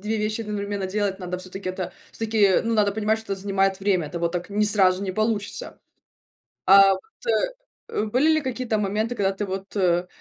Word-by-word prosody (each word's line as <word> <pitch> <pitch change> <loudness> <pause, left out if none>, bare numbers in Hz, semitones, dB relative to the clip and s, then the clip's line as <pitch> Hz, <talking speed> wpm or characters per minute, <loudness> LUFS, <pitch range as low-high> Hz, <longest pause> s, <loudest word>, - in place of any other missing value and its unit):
2 215 +2 -2
вещи 215 +1 -1
одновременно 205 -2 -3
делать, 195 0 -1
надо 180 -1 -4
всё-таки 185 +1 -7
это 185 0 -4 0.2
всё-таки 215 -4 +2
ну 230 - 0
надо 205 -2 +3
понимать, 220 +1 0
что 220 -3 -4
занимает 195 0 0
время, 190 -5 +1
это 170 +4 -5
вот 170 0 -1
так 175 +2 -4
не 210 +1 +2
сразу 195 -2 +4
не 190 -2 -3
получится. 215 0 -2 0.9
А 195 +1 +8
вот, - - -5 0.9
э, - - -1
были 255 +8 +2
ли 310 - +2
какие-то 255 -4 -2
моменты, 210 +4 -1
когда 195 -3 +1
ты 205 +2 -3
вот, 195 +1 -6
э, 180 -2 +2
200 Hz, 190 wpm, -24 LUFS, 190-215 Hz, 0.9 s, А